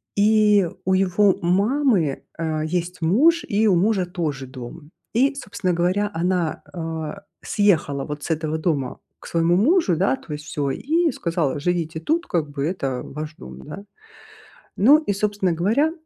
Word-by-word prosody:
И 210 -2 +4 0.2
у 190 - +2
его 190 +1 +3
мамы, 195 - +1
э, 160 -2 -2
есть 175 +2 -3
муж, 285 - +4
и 215 +2 +2
у 190 - +4
мужа 190 +1 +2
тоже 155 -7 -4
дом. 130 +4 -10 0.2
И, 270 +5 +3
собственно 195 -7 -3
говоря, 185 +4 +1
она, 175 -1 -1
а, 165 +2 -5 0.2
съехала 160 -9 +1
вот 150 0 -6
с - - -5
этого 155 0 -1
дома 150 -6 -2 0.2
к - - -12
своему 170 +1 +2
мужу, 225 - +3
да, 195 +9 +2
то 160 - -9
есть 150 0 -7
всё, 145 -3 -2
и 325 - +1
сказала: 165 - -1
"Живите 160 0 -1
тут, 330 - 0
как 155 -4 -1
бы, 140 -1 -3
это 135 -7 -2
ваш 155 +2 -7
дом". 65 0 -11
Н-да. 200 - -9 0.9
Ну 265 +10 +7
и, 305 - -2
собственно 200 -2 0
говоря, 220 - +2
175 Hz, 160 wpm, -22 LUFS, 155-205 Hz, 0.9 s, Ну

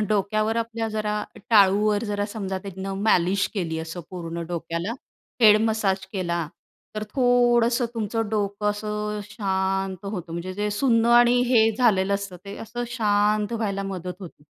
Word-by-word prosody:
हं - - +1
डोक्यावर 215 +2 +1
आपल्या 230 -1 -2
जरा, 215 -1 -2 0.4
टाळूवर 205 0 +4
जरा 205 -1 -1
समजा 195 -3 -4
त्यांनं 195 0 -6
मालिश 190 -2 +2
केली 165 -5 -2
असं 165 +2 -6
पूर्ण 170 -2 -5
डोक्याला. 170 +4 -3 0.5
हेड 210 -1 +8
मसाज 200 -4 0
केला, 170 -4 -2 0.5
तर 215 - -2
थोडंसं 245 -1 +3
तुमचं 225 0 -2
डोकं 210 -1 -1
असं 210 0 -3
शांत 190 -2 -2
होतं. 180 -5 -5
म्हणजे 170 +2 -4
जे 210 +1 -1
सुन्न 230 +1 +2
आणि 240 +1 +5
हे 225 -3 +5
झालेलं 200 -5 +3
असतं 200 -2 -4
ते 200 0 -8
असं 240 +2 -5
शांत 210 -2 +1
व्हायला 205 -4 -2
मदत 185 -2 -5
होते. 170 -5 -11
205 Hz, 150 wpm, -24 LUFS, 190-220 Hz, 0.5 s, हेड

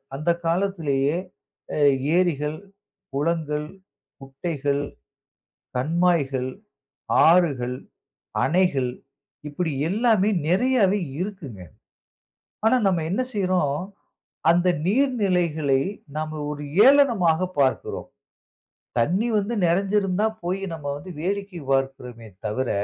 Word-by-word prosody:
அந்த 155 +4 -2 0.2
காலத்திலேயே 165 -5 0 0.6
அ - - -2 0.4
ஏரிகள், 155 -4 0 0.6
குளங்கள், 150 0 -1 0.5
குட்டைகள், 140 +1 -2 0.9
கண்மாய்கள், 145 -3 +1 0.8
ஆறுகள், 140 -8 +3 0.7
அணைகள் 145 -6 +2 0.6
இப்பிடி 160 +2 -2 0.2
எல்லாமே 215 0 +3 0.2
நிறையாவே 205 0 +3 0.2
இருக்குங்க. 175 - -6 1.1
ஆனா, 255 +3 +5
நம்ம 175 -4 +2
என்ன 210 +7 +1
செய்றோம், 180 -6 0 0.7
அந்த 175 +2 +3 0.2
நீர்நிலைகளை 180 - +2 0.4
நாம 155 0 -3
ஒரு 150 0 -5 0.2
ஏளனமாக 205 - +4
பார்க்கிறோம். 130 -1 0 0.9
தண்ணீ 180 - +2
வந்து 210 +4 -2
நிறைஞ்சுருந்தா 195 +3 +1 0.2
போய் 185 +2 -1
நம்ம 155 -3 -7
வந்து 145 +6 -9
வேடிக்கை 195 +1 -3
பார்க்கிறோமே 135 -4 -2 0.2
தவிர, 120 +5 -1
170 Hz, 85 wpm, -24 LUFS, 140-195 Hz, 1.1 s, ஆனா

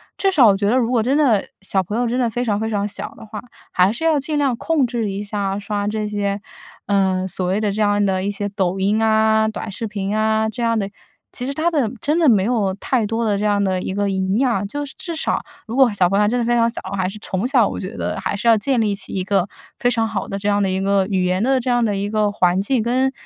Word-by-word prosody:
至 390 - +1
少 300 -10 +5
我 200 - +5
觉 200 +1 0
得 245 - +3
如 240 -2 +1
果 240 -3 +2
真 260 +6 +1
的 245 -10 +2
小 195 0 0
朋 205 +4 -4
友 245 - +1
真 240 +2 -1
的 240 -2 +1
非 245 +3 -2
常 205 -3 0
非 220 +1 -2
常 205 -2 -1
小 205 - -5
的 - - -11
话， 210 -1 -7 0.3
还 180 +2 +3
是 235 +9 -5
要 320 -3 +3
尽 295 +2 -2
量 275 -4 +1
控 305 +2 +1
制 235 -3 -2
一 195 +1 -4
下 200 -1 -2
刷 205 0 -3
这 215 0 -2
些， 205 -1 -2 0.5
呃， 190 -2 +1
所 185 0 -2
谓 190 +3 +1
的 210 -1 0
这 210 +2 -2
样 205 -1 +2
的 190 -1 0
一 200 - -1
些 205 0 -3
抖 190 -2 -1
音 210 +3 +1
啊， 220 0 +3
短 215 0 -5
视 225 +3 -4
频 200 -1 -3
啊， 220 0 +1
这 220 - -6
样 230 -1 +1
的。 200 -2 -1 0.4
其 250 - -5
实 275 - -2
它 315 +4 +1
的 280 -9 0
真 300 +8 0
的 320 -4 +5
没 205 -5 +4
有 210 -4 0
太 230 +3 0
多 225 +2 -1
的 205 -2 +1
这 205 - -3
样 205 -1 +2
的 185 -2 0
一 190 - -3
个 205 0 0
营 190 +1 0
养， 235 -6 +1
就 290 +7 -4
是 275 - -9
至 340 -2 -5
少 315 - -1 0.3
如 225 - -5
果 265 -3 +5
小 185 -3 +3
朋 195 +2 +2
友 210 - +3
真 245 +3 0
的 235 - 0
非 240 +1 +2
常 230 -1 +3
小， 235 - -6 0.2
还 185 -1 0
是 205 - -9
从 200 +2 -2
小 250 -6 +3
我 - - -5
觉 195 +5 -7
得 - - -3
还 - - -2
是 205 +4 -3
要 230 - +7
建 255 +4 +1
立 215 -2 +1
起 195 -1 -5
一 185 - -1
个 195 -1 +1 0.3
非 245 - +2
常 225 -2 +1
好 220 -3 -3
的 195 - -4
这 205 - -3
样 205 0 +2
的 195 - +1
一 185 0 0
个， 195 0 +2
语 190 -3 0
言 180 +1 0
的 265 +1 +2
这 255 - -3
样 245 -1 +2
的 210 -3 0
一 200 +1 -2
个 210 -1 +1
环 180 -2 +2
境 240 +4 +1
跟 255 +4 +1
210 Hz, 305 characters per minute, -20 LUFS, 200-240 Hz, 0.5 s, 要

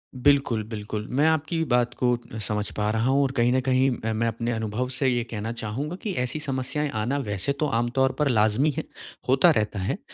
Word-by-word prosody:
बिल्कुल, 130 -4 +2
बिल्कुल। 105 -1 -5
मैं 150 - +4
आपकी 160 +1 +1
बात 120 0 +2
को 125 -1 +3 0.2
समझ 105 0 -2
पा 105 0 +1
रहा 110 +3 +1
हूँ 140 +1 +3
और 135 - 0
कहीं 120 +1 +3
न 130 - +3
कहीं 130 +1 +3 0.2
अ, 110 - 0
मैं 115 +2 0
अपने 115 +1 -2
अनुभव 110 +2 -2
से 130 +1 +1
ये 120 -2 +1
कहना 110 +1 -3
चाहूँगा 120 +9 -4
कि 210 - -2
ऐसी 125 +5 -3
समस्याएँ 140 +1 -2
आना, 130 +6 0
वैसे 105 -2 -2
तो 155 - +2
आमतौर 130 +3 +1
पर 150 - +3
लाज़मी 110 +6 +3
है, 160 - -1 0.5
होता 135 +7 +6
रहता 105 -1 -1
है। 95 - -1
अ, - - -15
125 Hz, 215 wpm, -25 LUFS, 110-140 Hz, 0.5 s, होता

